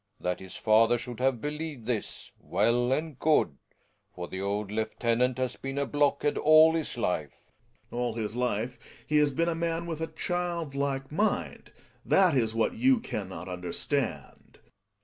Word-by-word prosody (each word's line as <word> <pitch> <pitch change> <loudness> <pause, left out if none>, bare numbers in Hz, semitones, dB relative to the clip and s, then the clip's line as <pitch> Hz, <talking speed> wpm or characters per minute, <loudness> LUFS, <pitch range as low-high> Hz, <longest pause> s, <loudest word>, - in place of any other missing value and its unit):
jThat 90 -1 -2
his 95 -1 -10
father 115 +2 +4
should 120 0 -7
have 130 -2 +1
believed 150 -4 -5
this— 115 -3 -4
well 120 +6 +1
and 150 0 -2
good; 150 - +2 0.6
/for 90 -1 -4
the 95 - -5
old 100 +1 -2
lieutenant 115 +3 0
has 130 -1 -2
been 135 +1 -5
a 140 - +1
blockhead 145 +1 +1
all 155 +1 +7
his 160 -6 -3
life. 80 - -1 0.6
Gregers. 120 - -3
All 120 -2 0
his 110 -1 -3
life 125 0 -1 0.3
he 150 - +1
has 150 -1 +4
been 165 +5 0
a 170 - +1
man 165 0 -2
with 165 -2 -5
a 160 - -1
child 170 -2 -3
like 140 -1 -2
mind 210 +8 -1 0.2
— - - -34
that 185 -6 +5
is 115 -3 +1
what 115 - +1
you 255 +1 +3
can 105 - -5
not 95 0 -7
understand. 90 -1 -3
130 Hz, 170 wpm, -28 LUFS, 110-155 Hz, 0.6 s, all